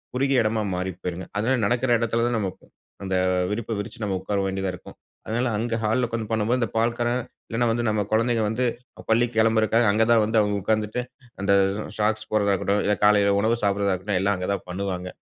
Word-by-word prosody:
குறுகிய 135 0 +2
இடமா 110 0 0
மாறி 90 +1 -2
போயிருங்க. 90 +1 -4
அதுனால 125 +5 +1
நடக்கிற 120 +3 +1
இடத்தில 115 0 0
தான் 120 -2 0
நம்ம 95 -2 -1 0.5
அந்த 95 -1 -2 0.3
விரிப்ப 110 +2 -3
விரிச்சு 105 +2 -6
நம்ம 95 -2 -1
உட்கார 100 +2 -2
வேண்டியதா 95 -1 -2
இருக்கும். 90 - -11 0.3
அதனால 120 +3 -1
அங்க 115 +1 -1
ஹால்ல 115 +4 +1
உட்கார்ந்து 115 -2 -4
பண்ணும்போது, 110 +3 +1
அந்த 115 - 0
பால்காரன் 120 +2 +1 0.3
இல்லன்னா 120 +1 0
வந்து 120 +1 -1
நம்ம 105 -1 +1
குழந்தைங்க 115 0 +2
வந்து 125 +3 0 0.4
பள்ளிக்கு 115 0 +2
கிளம்புறக்காக 110 0 +3
அங்க 110 +2 +3
தான் 115 -2 +5
வந்து 110 +1 +2
அவுங்க 105 -1 0
உட்கார்ந்துட்டு, 110 +3 0 0.4
அந்த 100 0 +2 0.4
ஷாக்ஸ் 110 +1 0
போட்றதா 100 -2 +2
இருக்கட்டும், 100 +1 0
இல்ல 105 - +2
காலையில 100 -1 +4
உணவு 115 +3 +2
சாப்பிட்றதா 100 -1 +1
இருக்கட்டும், 95 +1 -1
எல்லாம் 100 +1 +2
அங்க 90 +2 -4
தான் 100 - -5
பண்ணுவாங்க. 90 -1 -3
110 Hz, 190 wpm, -24 LUFS, 100-115 Hz, 0.5 s, தான்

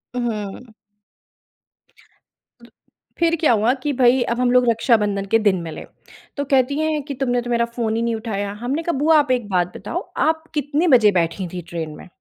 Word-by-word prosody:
हुँ। 225 -1 -4 2.4
फिर 335 0 +2
क्या 315 - +3
हुआ 225 +2 +3
कि 295 - 0
भई, 250 0 +4
अब 235 +1 -2
हम 250 -1 +2
लोग 250 0 +4
रक्षाबंधन 210 -4 +1
के 225 - +5
दिन 195 -5 +1
मिले। 165 -2 -7 0.5
तो 285 - -1
कहती 275 +1 +1
हैं 310 -1 0
कि 285 0 -6
"तुमने 245 -2 -1
तो 240 - -7
मेरा 235 0 +2
फ़ोन 235 -2 -3
ही 230 - -1
नहीं 235 -1 0
उठाया।" 205 -3 -4
हमने 280 +7 -2
कहा, 340 -5 -1
"बुआ, 310 +2 +4
आप 285 -3 0
एक 240 -5 0
बात 180 -2 0
बताओ, - - -4 0.2
आप 320 0 +1
कितने 295 +3 0
बजे 235 -7 +6
बैठी 175 +1 -1
थी 180 - -4
ट्रेन 160 -3 -5
में? - - -12
240 Hz, 185 wpm, -21 LUFS, 210-280 Hz, 2.4 s, बजे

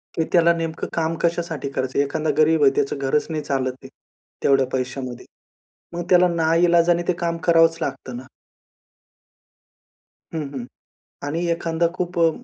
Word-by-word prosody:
की 160 - +1
त्याला 170 -1 +5
नेमकं 165 -1 -4
काम 165 0 0
कशासाठी 165 -4 -1
करायचं 130 -1 -3
आहे. - - +5
एखादा 155 +2 -2
गरीब 155 0 +4
आहे 135 - +6
त्याचं 140 - 0
घरच 140 +2 0
नाही 155 -2 -3
चालत 130 -2 -1
आहे - - -9 0.6
तेवढ्या 135 -1 +4
पैशामध्ये. 130 -1 -4 0.7
मग 175 - -3
त्याला 180 0 +6
नाईलाजाने 170 +1 +3
ते 180 - +3
काम 170 -1 -1
करावंच 165 -1 +5
लागतं 130 -5 -4
ना. 130 - -10 2.1
हं, 160 - -2
हं. 130 -3 -5 0.6
आणि 165 +4 -2
एखादा 165 0 0
खूप 175 -1 -3
अ, 165 -1 +5
160 Hz, 150 wpm, -22 LUFS, 140-170 Hz, 2.1 s, आहे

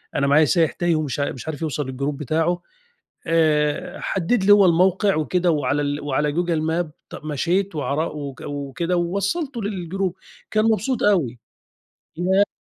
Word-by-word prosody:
أنا 140 -1 +2
معايا 150 +2 +5
سايح 165 -2 +2
تايه 175 -2 0
ومش 150 -3 -2
مش 135 -1 -3
عارف 160 0 -5
يوصل 150 -2 -2
للجروب 140 +2 -3
بتاعه. 160 +4 0 0.7
آآ، 155 -3 +1
حدد 195 +3 0
لي 205 - +7
هو 205 -1 +7
الموقع 185 +3 +3
وكده 175 +3 +1
وعلى 145 -2 +1
ال 145 0 -2
على 150 +2 +1
جوجل 170 -1 0
ماب 160 0 -1 0.2
ط - - -12
مشيت 175 +6 0
وعر 145 -1 -1 0.2
و 140 -2 -5
وكده 145 +5 -2
ووصلته 200 - -1
للجروب. 190 -2 -2 0.4
كان 215 0 +2
مبسوط 225 +3 +1
أوي. 160 - +2 0.8
لأ 190 +4 +3
165 Hz, 150 wpm, -22 LUFS, 150-190 Hz, 0.8 s, لي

